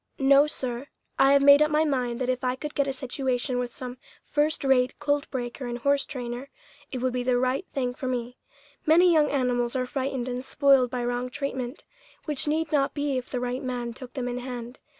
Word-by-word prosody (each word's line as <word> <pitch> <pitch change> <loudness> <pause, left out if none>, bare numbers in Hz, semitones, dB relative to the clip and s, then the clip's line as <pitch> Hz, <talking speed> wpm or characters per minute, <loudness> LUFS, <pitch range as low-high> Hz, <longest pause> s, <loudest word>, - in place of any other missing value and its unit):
"No, 275 +2 +5
sir; 255 -2 -3 0.3
I 270 +1 +6
have 280 0 +5
made 285 +1 +8
up 300 - +4
my 310 +1 +2
mind 250 -4 -1
that 255 - 0
if 255 +1 -1
I 250 0 +1
could 295 +3 -6
get 280 -1 +1
a - - 0
situation 255 -1 -2
with 245 -1 -3
some 250 0 -7 0.2
first 300 +1 0
rate 260 -1 +3
colt 290 0 0
breaker 245 0 -4
and 240 0 -3
horse 280 +3 +1
trainer, 245 0 -5 0.4
it 260 - -3
would 255 -1 +1
be 250 - -1
the 245 0 +2
right 255 +8 0
thing 250 -3 -2
for 260 - -5
me. 245 -1 -3 0.5
Many 345 +3 +6
young 305 -2 +4
animals 245 -3 0
are 255 -1 0
frightened 260 -1 -3
and 250 0 -3
spoiled 270 -2 +4
by 245 0 -3
wrong 245 +1 -2
treatment, 260 -1 -4 0.4
which 300 -2 -2
need 315 +1 0
not 280 -2 +1
be 285 -2 -1
if 250 - -11
the 250 - -2
right 250 +1 -2
man 245 -2 -3
took 250 +1 -11
them 255 -2 -2
in 245 0 -3
hand. 245 0 -7
255 Hz, 215 wpm, -26 LUFS, 245-280 Hz, 0.5 s, made